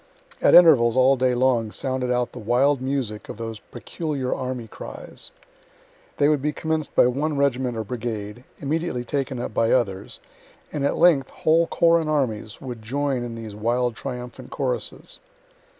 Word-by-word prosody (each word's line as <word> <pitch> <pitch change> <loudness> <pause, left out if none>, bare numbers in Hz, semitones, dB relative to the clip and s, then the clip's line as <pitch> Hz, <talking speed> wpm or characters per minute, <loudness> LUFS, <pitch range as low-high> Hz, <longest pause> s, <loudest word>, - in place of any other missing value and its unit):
At - - +6
intervals 125 -10 +7
all 130 +1 +5
day 130 -1 +1
long 120 -3 +2
sounded 130 0 -2
out 125 -1 0
the 125 - -9
wild 125 +5 +2
music 130 -6 -3
of - - -7
those 115 -2 -6
peculiar 140 +1 -4
army 125 -3 -4
cries. - - -9 0.9
They 145 - +4
would 150 -2 +2
be 150 +2 0
commenc'd 160 0 -3
by - - +6
one 140 +4 0
regiment 130 -3 0
or 110 - -2
brigade, 110 0 -5
immediately 145 -3 -2
taken 135 0 -2
up 120 - -4
by 115 +1 +2
others, 100 -6 -1 0.5
and 145 - -2
at 140 - +1
length 150 -7 +4
whole 165 +1 +2
corps 170 0 +3
and 160 -2 -3
armies 115 -8 -1
would 125 -4 -7
join 135 +4 -1
in 120 -1 -6
these 110 -2 -8
wild 120 +2 0
triumphant 125 -1 -7
choruses. - - -4
125 Hz, 165 wpm, -23 LUFS, 115-140 Hz, 0.9 s, intervals